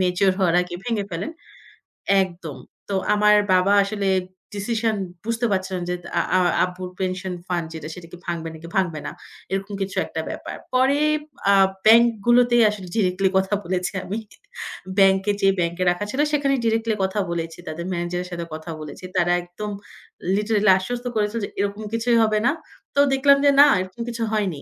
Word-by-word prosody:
Mature 185 Hz, +1 st, +2 dB
হওয়ার 175 Hz, -3 st, +2 dB
আগে 180 Hz, 0 st, -7 dB
ভেঙে 225 Hz, -4 st, -1 dB
ফেলেন 175 Hz, -, -4 dB, 0.9 s
একদম। 170 Hz, -6 st, -5 dB, 0.3 s
তো 200 Hz, -, -1 dB, 0.2 s
আমার 210 Hz, 0 st, +5 dB, 0.2 s
বাবা 185 Hz, +2 st, +4 dB
আসলে 200 Hz, -1 st, -1 dB, 0.5 s
ডিসিশন 225 Hz, +2 st, 0 dB, 0.3 s
বুঝতে 230 Hz, +1 st, -1 dB
পারছে 190 Hz, -1 st, 0 dB
না 180 Hz, -, -3 dB
যে 180 Hz, -, 0 dB, 0.2 s
আ -, -, +4 dB, 0.2 s
আ -, -, +4 dB, 0.3 s
আব্বুর 180 Hz, 0 st, -7 dB
পেনশন 185 Hz, 0 st, -2 dB
ফান্ড 175 Hz, -3 st, -2 dB
যেটা 155 Hz, -1 st, -7 dB
সেটা 175 Hz, -2 st, -11 dB
কি 180 Hz, -, -9 dB
ভাঙবে, 170 Hz, -1 st, -3 dB
নাকি 160 Hz, +1 st, -10 dB
ভাঙবে 175 Hz, -5 st, 0 dB
না। -, -, -4 dB, 0.4 s
এরকম 195 Hz, +1 st, -3 dB
কিছু 195 Hz, 0 st, -3 dB
একটা -, -, -4 dB
ব্যাপার। -, -, -6 dB, 0.2 s
পরে 265 Hz, +3 st, +3 dB, 0.5 s
আ -, -, +6 dB, 0.3 s
ব্যাংক 230 Hz, +2 st, +8 dB, 0.2 s
গুলোতেই 240 Hz, -1 st, +5 dB
আসলে 200 Hz, -3 st, -6 dB
ডিরেক্টলি 190 Hz, -2 st, +2 dB
কথা 190 Hz, +2 st, 0 dB
বলেছি 180 Hz, +2 st, -2 dB
আমি। 205 Hz, +4 st, -4 dB, 0.8 s
ব্যাংকে 195 Hz, +1 st, +4 dB
যেয়ে, 195 Hz, 0 st, +4 dB
ব্যাংকে 170 Hz, +1 st, -1 dB
রাখা 175 Hz, +4 st, -3 dB
ছিল, 265 Hz, -, -4 dB
সেখানেই 275 Hz, -2 st, +1 dB
ডিরেক্টলি 225 Hz, 0 st, +1 dB
কথা 190 Hz, +2 st, -1 dB
বলেছি। 165 Hz, -1 st, -4 dB
তাদের 165 Hz, +2 st, -5 dB
ম্যানেজারের 175 Hz, +1 st, -3 dB
সাথে 170 Hz, -1 st, -4 dB
কথা 160 Hz, +1 st, -7 dB
বলেছি। 155 Hz, +4 st, -9 dB
তারা 175 Hz, 0 st, +3 dB
একদম 190 Hz, +4 st, -7 dB, 0.6 s
লিটারেলি 210 Hz, -1 st, +3 dB
আশ্বস্ত 245 Hz, +6 st, -4 dB
করেছিল, 210 Hz, +1 st, 0 dB
যে -, -, -9 dB
এরকম 200 Hz, +2 st, -2 dB
কিছুই 230 Hz, +1 st, +2 dB
হবে 215 Hz, -1 st, +2 dB
না। -, -, +4 dB, 0.4 s
তো 280 Hz, -, +2 dB
দেখলাম 280 Hz, +1 st, +5 dB
যে 285 Hz, -, +7 dB
না 290 Hz, -, +9 dB
এরকম 185 Hz, +5 st, -8 dB
কিছু 230 Hz, -1 st, -3 dB
হয়নি। 190 Hz, -9 st, -1 dB
195 Hz, 175 wpm, -23 LUFS, 180-220 Hz, 0.9 s, না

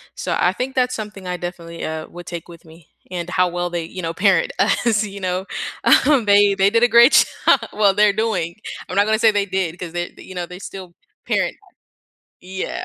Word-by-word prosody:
So, -, -, -2 dB
I -, -, +2 dB
think 260 Hz, +1 st, -4 dB
that's 255 Hz, -1 st, +1 dB
something 210 Hz, -3 st, -7 dB
I 180 Hz, -, -2 dB
definitely, 170 Hz, -1 st, -7 dB
uh, 155 Hz, 0 st, -4 dB
would 175 Hz, 0 st, -11 dB
take 170 Hz, -2 st, -7 dB
with 170 Hz, -1 st, -14 dB
me, 160 Hz, 0 st, -17 dB, 0.2 s
and 175 Hz, -1 st, -4 dB
how 180 Hz, 0 st, +2 dB
well 175 Hz, 0 st, -3 dB
they, 170 Hz, -1 st, -3 dB
you 185 Hz, +3 st, -8 dB
know, 165 Hz, -1 st, -3 dB
parent 185 Hz, -1 st, +2 dB
us, 215 Hz, +1 st, +2 dB
you 200 Hz, -1 st, -7 dB
know, 185 Hz, 0 st, -2 dB, 0.6 s
um, 285 Hz, -5 st, +4 dB
they 205 Hz, 0 st, +5 dB
they 195 Hz, 0 st, +3 dB
did 230 Hz, +2 st, +2 dB
a -, -, +6 dB
great 240 Hz, +4 st, +8 dB, 0.4 s
job! -, -, +6 dB
Well, 205 Hz, -2 st, +3 dB
they're 205 Hz, 0 st, +4 dB
doing 195 Hz, -7 st, -1 dB, 0.3 s
I'm 180 Hz, -, -6 dB
not 200 Hz, +1 st, +4 dB
gonna 220 Hz, 0 st, +1 dB
say 225 Hz, -1 st, +5 dB
they 205 Hz, -1 st, 0 dB
did, 180 Hz, -3 st, -1 dB
'cause 175 Hz, -2 st, -7 dB
they, 175 Hz, 0 st, -4 dB
you 185 Hz, -, -11 dB
know, 175 Hz, -, -3 dB
they 180 Hz, +1 st, -11 dB
still 190 Hz, -3 st, -9 dB, 0.3 s
parent, -, -, 0 dB, 0.9 s
yeah. 190 Hz, +1 st, -5 dB
185 Hz, 215 wpm, -20 LUFS, 175-210 Hz, 0.9 s, great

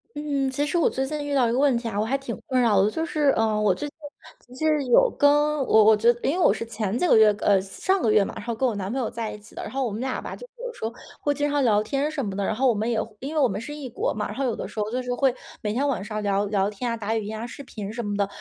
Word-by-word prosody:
嗯， 285 Hz, -2 st, -1 dB
其 285 Hz, +3 st, -1 dB
实 320 Hz, -, -1 dB
我 335 Hz, -, +3 dB
最 265 Hz, -, -2 dB
近 295 Hz, +1 st, -4 dB
遇 285 Hz, 0 st, -1 dB
到 255 Hz, -3 st, +4 dB
一 -, -, 0 dB
个 245 Hz, -, +1 dB
问 275 Hz, -3 st, +3 dB
题 235 Hz, 0 st, -4 dB
啊， 205 Hz, -2 st, -2 dB
我 -, -, +2 dB
还 270 Hz, +4 st, 0 dB
挺 270 Hz, -4 st, -5 dB
困 260 Hz, -1 st, +1 dB
扰 220 Hz, -5 st, +4 dB
的。 200 Hz, -, +3 dB
就 320 Hz, +8 st, -2 dB
是， 305 Hz, -4 st, +1 dB
呃， 220 Hz, -1 st, +1 dB
我 200 Hz, -3 st, +4 dB
最 295 Hz, -, -4 dB
近 290 Hz, -, -14 dB, 0.5 s
其 250 Hz, -, -14 dB
实 305 Hz, -2 st, +2 dB
有 260 Hz, -, +5 dB
跟 285 Hz, -9 st, +3 dB, 0.3 s
我 220 Hz, -5 st, +5 dB
我 220 Hz, 0 st, +7 dB
觉 225 Hz, +3 st, +4 dB
因 -, -, +2 dB
为 -, -, -1 dB
我 -, -, +6 dB
是 230 Hz, -, -5 dB
前 220 Hz, -1 st, -2 dB
几 360 Hz, -, +1 dB
个 -, -, +5 dB
月， 215 Hz, -1 st, +7 dB
呃， 195 Hz, -2 st, +4 dB
上 275 Hz, -, -1 dB
个 220 Hz, -, +2 dB
月 210 Hz, -1 st, +5 dB
嘛， -, -, -6 dB
然 -, -, -7 dB
后 235 Hz, -1 st, -2 dB
跟 260 Hz, +4 st, +1 dB
我 240 Hz, -, 0 dB
男 195 Hz, 0 st, -4 dB
朋 265 Hz, -, -2 dB
友 240 Hz, -, -1 dB
在 230 Hz, -2 st, -4 dB
一 210 Hz, -, -9 dB
起 210 Hz, -, -17 dB
的， -, -, -6 dB
然 -, -, -6 dB
后 270 Hz, 0 st, -1 dB
我 235 Hz, -, -2 dB
们 210 Hz, +3 st, -4 dB
俩 260 Hz, 0 st, -2 dB
吧， -, -, -6 dB
就 -, -, -11 dB, 0.2 s
有 -, -, -5 dB
时 -, -, -12 dB
候 225 Hz, +1 st, -2 dB, 0.3 s
会 290 Hz, -, +1 dB
经 290 Hz, +1 st, 0 dB
常 290 Hz, -1 st, +1 dB
聊 210 Hz, -4 st, +4 dB
天 275 Hz, +6 st, -1 dB
什 295 Hz, -5 st, -3 dB
么 195 Hz, -2 st, -4 dB
的。 200 Hz, -, -1 dB
然 210 Hz, -, -1 dB
后 265 Hz, +4 st, +2 dB
我 245 Hz, -, +4 dB
们 215 Hz, +2 st, -1 dB
也 225 Hz, -2 st, +1 dB
会 215 Hz, -, -9 dB
因 285 Hz, +4 st, -5 dB
为 305 Hz, -, +3 dB
我 265 Hz, -, +5 dB
们 200 Hz, -1 st, -4 dB
是 295 Hz, +6 st, -7 dB
异 290 Hz, -3 st, -6 dB
国 400 Hz, -, -2 dB
嘛， -, -, -3 dB
然 -, -, -7 dB
后 275 Hz, -, -2 dB
有 240 Hz, -, 0 dB
的 -, -, -5 dB
时 215 Hz, -, -7 dB
候 210 Hz, 0 st, -1 dB
就 250 Hz, +2 st, -1 dB
是 250 Hz, 0 st, -2 dB
会 260 Hz, 0 st, +2 dB, 0.3 s
每 210 Hz, -2 st, -2 dB
天 275 Hz, +5 st, 0 dB
晚 245 Hz, -9 st, -1 dB
上 215 Hz, 0 st, -4 dB
聊 200 Hz, 0 st, +1 dB
聊 200 Hz, -1 st, +1 dB
天 225 Hz, +4 st, -4 dB
啊、 230 Hz, -, -2 dB
打 220 Hz, 0 st, -2 dB
语 220 Hz, -2 st, -2 dB
音 215 Hz, +1 st, -5 dB
啊、 230 Hz, -, -5 dB
视 260 Hz, +4 st, -9 dB
频 210 Hz, -5 st, -7 dB
什 235 Hz, +1 st, -4 dB
么 205 Hz, -1 st, -2 dB
的。 200 Hz, -1 st, +1 dB
235 Hz, 370 characters per minute, -25 LUFS, 210-275 Hz, 0.5 s, 我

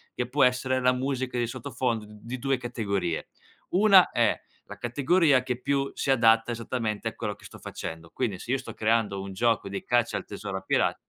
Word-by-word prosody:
che 125 Hz, 0 st, -2 dB
può 140 Hz, +1 st, +4 dB
essere 130 Hz, +1 st, +1 dB
la 125 Hz, 0 st, +3 dB
musica 130 Hz, -1 st, -2 dB
di 120 Hz, -, +1 dB
sottofondo 120 Hz, -2 st, -3 dB
d 105 Hz, 0 st, -14 dB
di 125 Hz, +3 st, -6 dB
2 135 Hz, +1 st, +1 dB
categorie. 100 Hz, -8 st, -2 dB, 0.4 s
Una 195 Hz, -1 st, +6 dB
è -, -, +2 dB, 0.3 s
la -, -, -9 dB
categoria 140 Hz, +2 st, +3 dB
che 125 Hz, -1 st, -3 dB
più 140 Hz, 0 st, 0 dB
si -, -, -3 dB
adatta 115 Hz, -2 st, +4 dB
esattamente 115 Hz, -2 st, -3 dB
a -, -, -14 dB
quello -, -, -3 dB
che -, -, -21 dB
sto -, -, -12 dB
facendo, 80 Hz, 0 st, -7 dB
quindi, 110 Hz, -8 st, -2 dB
se 120 Hz, -, -5 dB
io 135 Hz, -, +3 dB
sto 130 Hz, -, -8 dB
creando 110 Hz, -3 st, +1 dB
un 95 Hz, 0 st, -7 dB
gioco 115 Hz, +1 st, +1 dB
di 100 Hz, 0 st, -5 dB
caccia 120 Hz, -1 st, +1 dB
al -, -, -5 dB
tesoro 100 Hz, -1 st, -5 dB
a -, -, -6 dB
pira 95 Hz, -, +1 dB
120 Hz, 205 wpm, -27 LUFS, 105-130 Hz, 0.4 s, Una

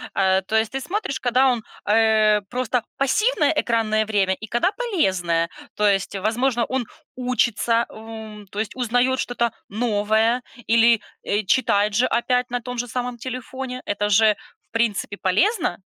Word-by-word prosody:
э, 190 Hz, -1 st, +3 dB
то 220 Hz, -, -1 dB
есть 220 Hz, +3 st, +1 dB
ты 270 Hz, -, -2 dB
смотришь, 395 Hz, -3 st, -3 dB
когда 255 Hz, +2 st, +3 dB
он, 230 Hz, -3 st, -2 dB, 0.2 s
э, 215 Hz, -1 st, +4 dB
просто 250 Hz, -1 st, -1 dB, 0.2 s
пассивное 300 Hz, -, +2 dB
экранное 220 Hz, -5 st, +1 dB
время 200 Hz, -3 st, +1 dB
и 220 Hz, -, -8 dB
когда 240 Hz, +10 st, +2 dB
полезное, 190 Hz, -, 0 dB, 0.3 s
то 210 Hz, -, +1 dB
есть, 195 Hz, -1 st, +1 dB
возможно, 235 Hz, +4 st, 0 dB
он 260 Hz, -3 st, -1 dB, 0.3 s
учится, 235 Hz, -2 st, +1 dB
м, 220 Hz, -1 st, -9 dB
то 205 Hz, -, -5 dB
есть 220 Hz, -, -3 dB
узнаёт 250 Hz, +1 st, +1 dB
что-то 235 Hz, -1 st, 0 dB, 0.2 s
новое 220 Hz, +2 st, +1 dB, 0.3 s
или, 230 Hz, 0 st, +5 dB, 0.3 s
э, 210 Hz, +1 st, +1 dB
читает 205 Hz, -2 st, +2 dB
же 245 Hz, +5 st, +3 dB
опять 250 Hz, +1 st, 0 dB
на 245 Hz, -, 0 dB
том 250 Hz, +1 st, -7 dB
же 245 Hz, +1 st, -2 dB
самом 245 Hz, 0 st, -3 dB
телефоне. 255 Hz, +1 st, -6 dB
Это 205 Hz, 0 st, -1 dB
же 215 Hz, +1 st, +5 dB, 0.4 s
в -, -, -71 dB
принципе 215 Hz, -3 st, -1 dB
полезно. 320 Hz, -, +1 dB
230 Hz, 155 wpm, -22 LUFS, 210-250 Hz, 0.4 s, или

